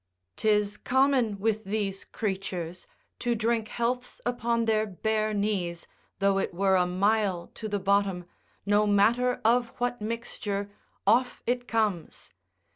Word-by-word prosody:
'Tis 210 -1 +1
common 260 -5 +2
with 220 +1 0
these 195 -1 -2
creatures, 185 -4 -4 0.3
to 240 -1 0
drink 225 0 0
healths 245 +2 -2
upon 235 -1 0
their 220 -1 +2
bare 215 +2 -1
knees, 200 -5 -1 0.3
though 195 0 +2
it 185 - -2
were 190 +1 +3
a 180 -1 +3
mile 195 -1 +1
to 220 - -6
the 205 - 0
bottom, 195 -2 +1 0.4
no 205 +1 +3
matter 230 +5 +3
of 240 +1 +4
what 245 -1 -1
mixture, 210 -2 -3 0.3
off 245 +5 +2
it 245 +1 -1
comes. 210 -7 -1
210 Hz, 130 wpm, -28 LUFS, 195-230 Hz, 0.4 s, of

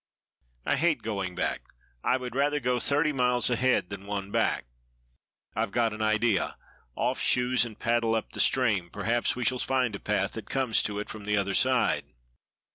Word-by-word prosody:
"I - - +1
hate 165 -1 +1
going 100 -5 -3
back. - - -1 0.4
I 125 - +2
would 125 -2 -6
rather 145 +2 +1
go 125 -1 0
thirty 150 +3 +2
miles 125 -1 +2
ahead 125 -6 +1
than 100 0 -7
one 100 -1 -4
back. - - +1 0.9
I've - - 0
got 115 +1 +1
an 110 - -6
idea; 110 -1 +1 0.4
off - - -1
shoes 125 0 +2
and 110 -3 -9
paddle 115 -1 +1
up 110 - -3
the - - -7
stream; 110 -9 +2
perhaps 115 +5 0
we 125 -1 -3
shall 125 +1 +1
find 125 -5 0
a - - -6
path - - -1
that - - -8
comes 130 -4 +2
to 105 -1 -3
it 105 - -4
from 105 -2 -8
the 105 0 +1
other 100 -1 0
side." 130 +4 +2
120 Hz, 185 wpm, -28 LUFS, 105-125 Hz, 0.9 s, I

